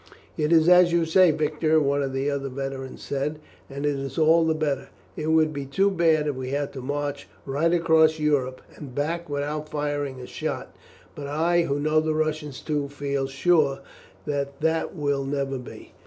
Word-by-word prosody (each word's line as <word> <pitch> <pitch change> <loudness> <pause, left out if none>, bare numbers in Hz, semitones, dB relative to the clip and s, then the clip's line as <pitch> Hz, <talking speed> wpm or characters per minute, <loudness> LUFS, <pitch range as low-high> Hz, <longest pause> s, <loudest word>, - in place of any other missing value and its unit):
"It 150 +1 0
is 165 -1 +5
as 180 -1 +7
you 170 -1 +2
say, 180 +2 +5
Victor," 155 +1 +2
one 140 -1 +1
of 135 -1 -2
the 135 +1 -1
other 140 -1 -2
veterans 135 0 -6
said, 140 +2 -2 0.3
"and 140 +1 -5
it 145 - +2
is 135 -1 -6
all 165 +1 +5
the 160 - +2
better. 150 -3 -2 0.3
It 155 - -4
would 160 -1 +3
be 140 -2 -5
too 195 +9 +2
bad 165 -4 +3
if 145 -2 -1
we 130 0 -5
had 140 +1 -2
to 135 - -6
march 145 +1 -3 0.2
right 145 +5 +1
across 160 -2 +4
Europe 140 -4 0
and 135 -5 -10
back 165 +3 -2
without 150 +1 -3
firing 145 -3 -3
a 125 - -7
shot, - - -5 0.4
but 145 -1 -7
I, 165 +4 +2
who 140 -2 -1
know 155 +1 +2
the 155 0 0
Russians 155 -3 -2
too, 145 -2 -2
feel 140 -1 -2
sure 140 -1 +2 0.4
that 140 -1 -3
that 160 +3 0
will 145 -3 0
never 135 -1 -2
be." 125 - -11
145 Hz, 190 wpm, -25 LUFS, 140-160 Hz, 0.4 s, as